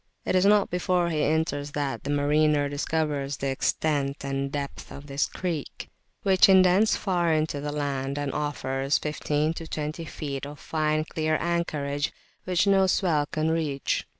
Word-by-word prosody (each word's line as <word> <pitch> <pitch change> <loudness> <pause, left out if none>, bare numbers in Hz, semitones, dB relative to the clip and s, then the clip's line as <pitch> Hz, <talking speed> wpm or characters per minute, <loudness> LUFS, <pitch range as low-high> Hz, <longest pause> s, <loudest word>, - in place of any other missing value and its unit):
It - - 0
is 185 +2 +4
not 205 -1 +4
before 180 -1 +1
he 155 -2 0
enters 145 -2 0
that 145 -2 -2
the - - -3
mariner 145 0 +2
discovers 145 -1 -2
the 135 - -2
extent 140 0 -1
and 135 0 -1
the - - -5
depth 140 0 -5
of 140 - -9
this 140 0 0
creek, 170 -6 -5 0.3
which 190 0 +5
indents 190 +3 +5
far 175 -4 0
into 155 -2 0
the 145 0 -3
land, 140 -2 -2
and 145 -1 -2
offers 135 -1 -1
15 150 0 -1
to 165 0 -7
20 155 +1 -4
feet 140 -3 -5
of 145 0 -10
fine 155 -1 0
clear 155 -1 0
anchorage 150 -4 -1 0.3
which 180 0 +2
no 195 -1 +4
swell 160 -6 +1
can 155 +1 -1
reach. 150 -4 -1
150 Hz, 165 wpm, -26 LUFS, 145-165 Hz, 0.3 s, which